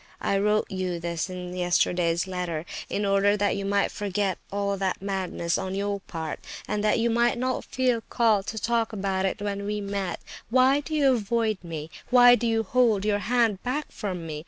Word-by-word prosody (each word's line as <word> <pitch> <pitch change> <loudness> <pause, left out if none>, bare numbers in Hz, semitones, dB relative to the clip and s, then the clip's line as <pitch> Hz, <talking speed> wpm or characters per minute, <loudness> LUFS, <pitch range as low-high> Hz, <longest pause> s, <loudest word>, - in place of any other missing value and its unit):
I 195 - +1
wrote 210 +1 +2
you 185 -2 -2
this 170 +1 -3
in 180 -1 -6
yesterday's 175 0 +1
letter, 180 -4 -3 0.2
in 205 - -1
order 200 +1 +3
that 205 0 +1
you 200 - -3
might 200 0 +1
forget 200 -2 -1
all 200 0 -1
that 190 -1 -1
madness 190 -3 -2
on 190 0 -3
your 200 0 -1
part, 165 -4 -6 0.3
and 210 0 -1
that 215 - +3
you 235 0 +1
might 235 +1 +2
not 255 +1 -1
feel 250 -3 0
called 220 -4 +2
to 220 - -4
talk 230 +1 0
about 195 -2 0
it 205 +2 -4
when 200 -1 -2
we 210 +1 -2
met. 200 -3 -3 0.3
Why 260 +3 +4
do 310 +2 -4
you 280 -3 +4
avoid 220 -2 0
me? 160 -2 -6 0.2
Why 245 -1 +8
do 240 -1 +1
you 225 -1 +1
hold 225 -3 +2
your 205 -1 +2
hand 225 -1 +1
back 285 +4 -3
from 185 -5 -4
me? 155 -2 -5
200 Hz, 195 wpm, -26 LUFS, 185-225 Hz, 0.3 s, Why